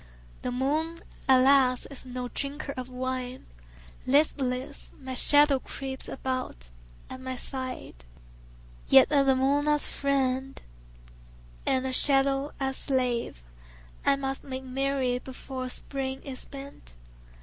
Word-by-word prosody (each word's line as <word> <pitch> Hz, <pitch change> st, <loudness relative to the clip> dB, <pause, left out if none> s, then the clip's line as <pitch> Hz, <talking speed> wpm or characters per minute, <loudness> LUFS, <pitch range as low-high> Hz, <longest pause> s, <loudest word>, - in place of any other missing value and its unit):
The 250 Hz, -, -2 dB
moon, 300 Hz, +6 st, 0 dB, 0.3 s
alas, 260 Hz, -1 st, +5 dB
is 265 Hz, -1 st, -7 dB
no 250 Hz, 0 st, -4 dB
drinker 280 Hz, +3 st, -4 dB
of 255 Hz, 0 st, -5 dB
wine; 255 Hz, 0 st, -4 dB, 0.6 s
Listless, 270 Hz, -1 st, +1 dB
my 260 Hz, -2 st, -6 dB
shadow 290 Hz, +1 st, +6 dB
creeps 265 Hz, 0 st, -6 dB
about 255 Hz, -, -4 dB, 0.4 s
at 260 Hz, -, -9 dB
my 260 Hz, 0 st, -4 dB
side. 255 Hz, -, -5 dB, 0.8 s
Yet 270 Hz, +1 st, +7 dB
with 280 Hz, -2 st, +4 dB
the 265 Hz, -, +5 dB
moon 280 Hz, +3 st, +2 dB
as 295 Hz, -1 st, +3 dB
friend 270 Hz, -1 st, -1 dB, 1.1 s
and 260 Hz, -1 st, +2 dB
the 260 Hz, -, -2 dB
shadow 275 Hz, +1 st, +3 dB
as 270 Hz, -1 st, -1 dB
slave 250 Hz, -, -1 dB, 0.6 s
I 280 Hz, -, +4 dB
must 270 Hz, -1 st, -3 dB
make 265 Hz, -1 st, -5 dB
merry 260 Hz, -1 st, 0 dB
before 260 Hz, 0 st, -7 dB
the -, -, -4 dB
Spring 265 Hz, 0 st, -4 dB
is 265 Hz, -2 st, -7 dB
spent. 275 Hz, -, -11 dB
265 Hz, 125 wpm, -28 LUFS, 255-275 Hz, 1.1 s, Yet